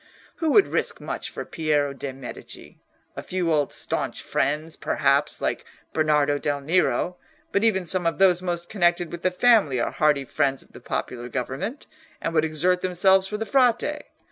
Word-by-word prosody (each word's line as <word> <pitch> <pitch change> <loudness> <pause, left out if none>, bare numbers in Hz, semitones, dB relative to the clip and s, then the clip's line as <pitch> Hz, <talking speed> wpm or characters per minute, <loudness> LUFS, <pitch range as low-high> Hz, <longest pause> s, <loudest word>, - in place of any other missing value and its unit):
Who 325 -2 0
would 405 - +6
risk - - -2
much - - -5
for - - -7
Piero 150 -3 0
de' 140 0 -5
Medici? 130 -1 -10 0.4
A - - -5
few 180 -3 -1
old 145 -2 +1
staunch - - -3
friends, 155 +3 -1
perhaps, - - +1
like - - -1 0.3
Bernardo 150 -2 +2
del 145 -1 -1
Nero; 180 +3 +1 0.3
but 200 - +1
even 190 -5 +2
some 175 0 +1
of 165 - -1
those 185 -2 +4
most 175 -1 -3
connected 175 -4 +1
with 175 - -7
the 185 - +2
family 185 - +3
are - - -1
hearty 150 -3 +2
friends 135 0 -1
of - - -26
the - - -12
popular 120 0 -4
government, 135 - -4 0.3
and 165 - -3
would 155 -1 +3
exert 180 +4 +1
themselves 190 +1 +3
for 210 - -4
the 225 - -3
Frate. 260 +4 +2
170 Hz, 175 wpm, -24 LUFS, 145-190 Hz, 0.4 s, would